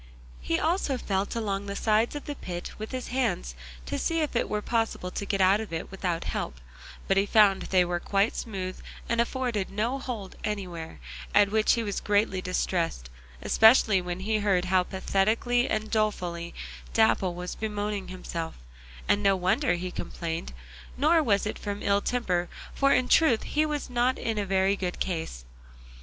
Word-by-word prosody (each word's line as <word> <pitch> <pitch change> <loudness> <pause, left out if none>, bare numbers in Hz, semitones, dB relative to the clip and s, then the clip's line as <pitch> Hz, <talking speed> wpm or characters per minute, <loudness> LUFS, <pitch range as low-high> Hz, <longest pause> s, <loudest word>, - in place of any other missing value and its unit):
He 165 - -1
also 315 -5 +1
felt 195 -3 -2
along 200 -3 -2
the 200 - -4
sides 220 +5 +2
of 290 - -6
the 290 - -4
pit 175 -9 -6
with 215 - -5
his 255 -1 -4
hands 60 - -1 0.3
to - - -3
see 330 0 0
if 300 -4 -2
it 235 - +1
were 210 0 -2
possible 225 -6 -1
to 200 - -4
get 195 -1 0
out 190 +2 +5
of 220 - -7
it 165 +2 -4
without 180 -3 -2
help, - - -4 0.5
but 195 - +2
he 200 +1 +3
found 205 -3 +5
they 185 -2 +2
were 175 0 -1
quite 200 +5 +1
smooth 185 -4 -4 0.3
and 235 0 +2
afforded 235 -5 -1
no 230 +7 -1
hold 230 -8 -6
anywhere, 180 -6 -4 0.4
at 205 -1 +5
which 220 0 +4
he 230 - 0
was 205 -2 -2
greatly 205 -2 +1
distressed, 170 - -1 0.3
especially 220 -3 +5
when 180 +1 -4
he 215 +2 0
heard 195 -3 +2
how 185 0 +3
pathetically 215 +7 +1
and 215 0 -2
dolefully 180 -6 -1 0.4
Dapple 210 -5 +3
was 180 +1 -5
bemoaning 210 -2 -3
himself, 170 -3 -5 0.5
and 205 - +3
no 195 -1 +4
wonder 190 +8 +1
he 180 +1 -4
complained, 165 -2 -4 0.5
nor 315 +5 +4
was 205 -8 +2
it 215 - -3
from 205 -1 -4
ill 200 0 +3
temper, 180 -9 -1 0.2
for 275 0 +3
in 255 - +3
truth 265 -9 +4
he 305 +1 +1
was 295 -1 -3
not 250 +1 +1
in 225 -2 -2
a 200 - -2
very 190 +1 +2
good 180 -2 -4
case. 160 - -3
200 Hz, 180 wpm, -27 LUFS, 185-230 Hz, 0.5 s, out